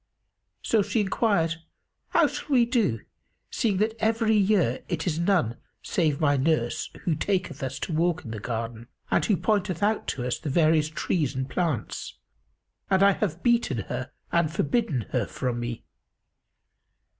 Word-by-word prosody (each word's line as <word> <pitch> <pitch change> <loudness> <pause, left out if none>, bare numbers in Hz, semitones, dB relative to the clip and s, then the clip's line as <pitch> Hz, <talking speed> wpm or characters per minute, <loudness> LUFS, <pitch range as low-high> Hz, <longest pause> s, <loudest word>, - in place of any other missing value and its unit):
So 225 - +3
she 205 +2 0
enquired, 190 -5 +1 0.5
"How - - +4
shall - - -4
we 250 -4 +5
do, 220 - +1 0.5
seeing 210 -5 +1
that 215 +3 +1
every 220 0 +2
year 195 - +2
it 165 -3 -2
is 165 -3 -1
none 170 - +1 0.3
save 155 -6 0
my 145 -2 +3
nurse 130 -4 0
who 170 - +1
taketh 175 -3 -1
us 130 -1 -3
to 170 - -3
walk 170 +2 +1
in 115 - -6
the 110 - -5
garden 115 +1 -4 0.2
and - - +3
who 205 - +2
pointeth 200 -4 0
out 215 +1 +1
to 125 -2 -2
us 125 - -1
the 155 - -4
various 155 +1 +3
trees 155 -3 -1
and 130 0 -2
plants; 160 - -2 0.7
and 190 0 +4
I 200 - +7
have 180 -4 -2
beaten 235 -1 +2 0.2
her - - -4 0.2
and 170 -2 +2
forbidden 155 - 0
her - - 0
from 125 -2 -3
me? 120 -1 -4
170 Hz, 160 wpm, -26 LUFS, 135-205 Hz, 0.7 s, I